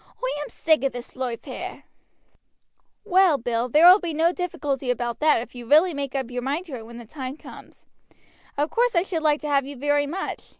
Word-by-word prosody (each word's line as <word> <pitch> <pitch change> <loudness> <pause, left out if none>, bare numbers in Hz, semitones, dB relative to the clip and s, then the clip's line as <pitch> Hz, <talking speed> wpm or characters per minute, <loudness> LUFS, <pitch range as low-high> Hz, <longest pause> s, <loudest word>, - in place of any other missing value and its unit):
Oi - - -3
am 295 - -6
sick 315 -3 +1
of 275 - 0
this 245 0 -8
loife 250 -3 -4
here." - - -7 1.2
"Well, 370 -6 +4
Bill, 240 0 -2
there 305 +7 +5
will 370 +3 +9
be 335 -4 -4
no 330 +2 +3
difficulty 285 -8 -3
about 240 -1 -2
that 300 -6 +3
if - - -15
you 240 -2 -9
really 325 +4 +5
make 280 -2 -4
up 260 -3 -3
your 245 0 -3
mind 285 +8 -2
to 300 -7 -7
it 225 -2 -9
when 235 0 -11
the 240 - -10
time 260 +3 -7
comes. - - -14 0.7
Of 295 +2 0
course 480 -2 +1
I 340 - +4
should 355 -4 -3
like 300 -1 +2
to 300 - -5
have 280 -2 +1
you 285 - -7
very 290 +2 +1
much. 350 +7 -5
290 Hz, 220 wpm, -24 LUFS, 250-325 Hz, 1.2 s, will